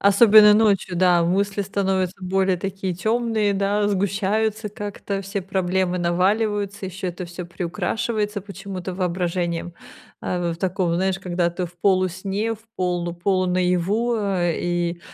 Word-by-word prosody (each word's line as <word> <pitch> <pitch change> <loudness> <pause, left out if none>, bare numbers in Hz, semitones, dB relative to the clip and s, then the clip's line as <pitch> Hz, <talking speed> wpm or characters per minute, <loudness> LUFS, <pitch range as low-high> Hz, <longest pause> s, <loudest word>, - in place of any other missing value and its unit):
Особенно 210 +1 +7
ночью, 205 -4 +2
да, 175 -1 +4
мысли 200 +3 0
становятся 190 -2 -1
более 190 0 +1
такие 190 0 -3
тёмные, 220 +1 0
да, 205 +1 +1
сгущаются 205 +2 0
как-то, 205 -1 -5
все 195 +1 -3
проблемы 185 -1 0
наваливаются, 200 +3 0
ещё 185 0 -5
это 180 +1 -6
всё 175 0 -7
приукрашивается 205 +4 -2
почему-то 195 -2 -7
воображением, 175 -1 -2 0.5
а 175 -1 -2
в - - -7
таком, 180 -1 0
знаешь, 190 +1 0
когда 180 -2 0
ты 175 +1 -3
в 175 - -8
полусне, 190 +3 0
в 225 +1 -19
полу 175 -1 -1
полу-наяву, 185 +5 +1
э, 185 -5 0
и, 175 0 -1
190 Hz, 130 wpm, -22 LUFS, 180-205 Hz, 0.5 s, Особенно